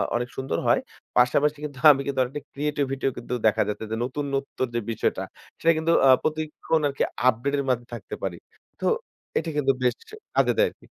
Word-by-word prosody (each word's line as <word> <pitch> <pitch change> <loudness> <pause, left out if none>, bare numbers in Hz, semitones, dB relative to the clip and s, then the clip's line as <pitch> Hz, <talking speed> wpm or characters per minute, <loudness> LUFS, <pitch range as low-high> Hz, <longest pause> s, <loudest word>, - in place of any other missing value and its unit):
অনেক 120 +1 -1
সুন্দর 130 -11 -2
হয়। - - +5 0.4
পাশাপাশি 140 +4 +4
কিন্তু 145 -3 -7
আমি 140 -1 +1
কিন্তু 140 -1 -2
আর 125 - -2
একটা 145 - -5
ক্রিয়েটিভিটিও 140 -2 -1
কিন্তু 120 +1 -5
দেখা 105 - +3
যাচ্ছে 105 +1 -3
যে 110 - 0
নতুনত্ব 140 +1 -3
যে 120 - +1
বিষয়টা 110 - -1 0.4
সেটা 165 - +4
কিন্তু 160 +1 +1 0.2
আ - - +7
প্রতিক্ষণ 155 +1 -1
আরকি 140 -1 -1 0.2
আপডেট 130 +4 +2
এর 140 - 0
মধ্যে 120 -1 0
থাকতে 120 - -6
পারি। - - -2 0.4
তো - - -3 0.5
এটা 165 - -1
কিন্তু 135 -2 +3
বেশ 125 - +3 0.4
কাজে - - +4
দেয় - - +5
আরকি। - - -21
135 Hz, 185 wpm, -25 LUFS, 125-150 Hz, 0.5 s, আ